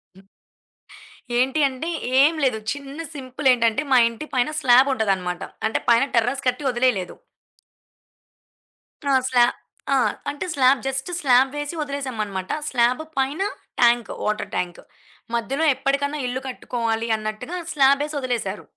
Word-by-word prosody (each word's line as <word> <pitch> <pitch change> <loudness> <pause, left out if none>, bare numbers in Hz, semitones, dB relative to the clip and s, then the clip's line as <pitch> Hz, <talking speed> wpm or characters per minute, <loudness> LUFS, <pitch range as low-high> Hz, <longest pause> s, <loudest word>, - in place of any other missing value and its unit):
హ్మ్. 190 0 -18 1.1
ఏంటి 265 +4 +1
అంటే, 270 +5 -5 0.3
ఏం 300 +4 +5
లేదు. 250 -5 +1
చిన్న 285 +2 -8
సింపుల్. 265 0 -3
ఏంటంటే 230 +2 +1
మా 255 - +7
ఇంటి 235 +7 -8
పైన 250 +2 +2
స్లాబ్ 260 0 +6
ఉంటదన్నమాట. 190 -6 -1 0.3
అంటే 220 - -2
పైన 235 +3 +5
టెర్రస్ 245 +4 +1
కట్టి 250 +3 0
వదిలేయలేదు. 240 -7 0 1.9
ఆ! - - +3 0.2
స్లాబ్ 245 -1 +4 0.4
ఆ! - - +4 0.3
అంటే 290 +4 -4
స్లాబ్. 260 -1 +4
జస్ట్ 270 +3 -3
స్లాబ్ 260 0 +4
వేసి 290 +3 -4
వదిలేసామన్నమాట. 230 -10 -4 0.2
స్లాబ్ 245 +2 +2 0.2
పైన 270 +6 0 0.4
ట్యాంక్, 240 -1 +3
వాటర్ 210 0 -2
ట్యాంక్. 175 -1 -3 0.5
మధ్యలో 270 +7 -1
ఎప్పటికైనా 280 +2 -1
ఇల్లు 255 +1 -3
కట్టుకోవాలి 230 -3 -2
అన్నట్టుగా 215 +9 -5 0.2
స్లాబేసి 280 +1 +3
వదిలేసారు. 235 -7 -3
255 Hz, 125 wpm, -23 LUFS, 230-275 Hz, 1.9 s, మా